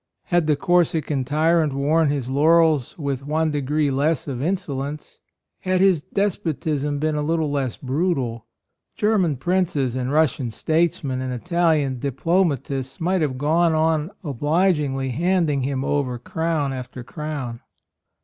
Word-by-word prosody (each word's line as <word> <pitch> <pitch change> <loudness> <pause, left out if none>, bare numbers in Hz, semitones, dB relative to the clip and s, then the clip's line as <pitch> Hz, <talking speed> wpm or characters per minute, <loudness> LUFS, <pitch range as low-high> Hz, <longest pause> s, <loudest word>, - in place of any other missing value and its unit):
Had 175 -3 +1
the 150 - +3
Cor 175 +4 +3
sican 150 -4 -1
tyrant 155 +2 +2
worn 150 +3 +2
his 140 -4 -2
laurels 155 0 +3
with 140 -4 -3
one 155 +2 0
degree 145 0 0
less 145 +5 0
of 130 -3 -4
insolence, 150 -4 -3 0.4
had 185 0 0
his 185 -5 +4
despotism 155 -7 -1
been 155 +2 0
a 150 - -1
little 160 0 0
less 135 -4 -2
brutal, 130 -6 -2 0.5
German 195 -9 +1
princes 150 -5 0
and 130 0 -2
Russian 145 -5 +1
statesmen 150 -1 0
and 130 0 -3
Italian 150 -1 +1
diplomatists 140 -2 -1
might 180 +2 +1
have 135 -4 -1
gone 160 +4 +2
on 155 0 +1
obligingly 145 -2 0
handing 165 -1 +1
him 135 0 -2
over 135 -4 0
crown 155 +2 -2
after 125 -1 -7
crown. 140 -4 -5
150 Hz, 135 wpm, -22 LUFS, 135-165 Hz, 0.5 s, his